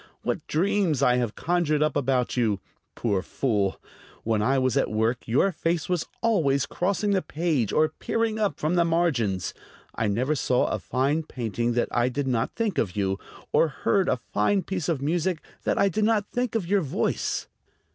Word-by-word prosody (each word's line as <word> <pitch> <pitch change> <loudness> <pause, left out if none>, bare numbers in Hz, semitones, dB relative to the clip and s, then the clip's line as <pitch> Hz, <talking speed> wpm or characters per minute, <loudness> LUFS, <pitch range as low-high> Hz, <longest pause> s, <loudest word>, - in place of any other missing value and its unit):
What - - -2
dreams 170 -4 +1
I 125 -2 +4
have 120 -3 -1
conjured 160 -4 +1
up 155 -2 0
about 130 -3 +1
you! 110 -5 +1 0.4
Poor 100 -5 0
fool! 100 -3 -1 0.4
When 110 -2 +1
I 130 +6 +2
was 130 -2 +1
at - - +2
work 110 +3 0
your 135 +12 +3
face 165 -1 -1
was 180 -3 -1 0.2
always 150 - +2
crossing 200 +3 0
the 190 -2 +2
page 150 - -1
or 155 0 +3
peering 225 -1 -1
up 210 -2 0
from 155 +3 0
the 175 -1 +4
margins. 145 - 0 0.4
I 115 - -1
never 125 +9 +1
saw 125 -3 +1
a 110 - -1
fine 135 +9 0
painting 120 -5 -2
that 120 - 0
I 120 +1 +2
did 140 +2 -2
not 120 -4 0
think 225 -6 0
of 95 -6 -1
you, 95 -1 0 0.3
or 165 - +5
heard 185 +6 +1
a - - +2
fine 120 - 0
piece 180 -5 -3
of 145 -5 -1
music 170 +2 0 0.3
that - - +1
I 200 - +4
did 205 +3 0
not 215 -1 +2
think 245 -1 -1
of 215 -6 0
your 200 +3 +2
voice." 140 -5 -1
145 Hz, 185 wpm, -26 LUFS, 120-180 Hz, 0.4 s, or